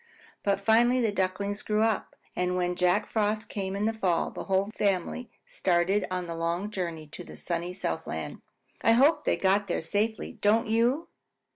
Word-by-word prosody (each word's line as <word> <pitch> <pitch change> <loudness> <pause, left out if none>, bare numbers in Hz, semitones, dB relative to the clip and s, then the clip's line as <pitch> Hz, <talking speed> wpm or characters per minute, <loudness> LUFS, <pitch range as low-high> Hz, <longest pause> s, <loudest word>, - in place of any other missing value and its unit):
But 200 -1 +1
finally 235 +5 +4
the 225 -4 +2
Ducklings 200 +1 -1
grew 215 0 +1
up, 225 -2 0 0.2
and 180 0 0
when 180 0 0
Jack 180 +3 +2
Frost 215 0 -1
came 195 -1 -3
in 205 +1 -1
the 225 - +1
fall, 185 -6 0
the - - -7
whole 195 +2 +1
family 200 +5 -1 0.2
started 185 +3 +1
on 180 -1 -2
the 170 - -5
long 170 +5 -2
journey 170 -5 -4
to 180 - -9
the - - -11
sunny 170 0 -3
Southland. 180 - -4 0.4
I 225 - +5
hope 280 +7 +4
they - - +2
got 195 +1 +2
there 175 - -1
safely, 215 +6 -1
don't 225 +1 +2
you? 235 +8 +1
200 Hz, 175 wpm, -28 LUFS, 180-220 Hz, 0.4 s, I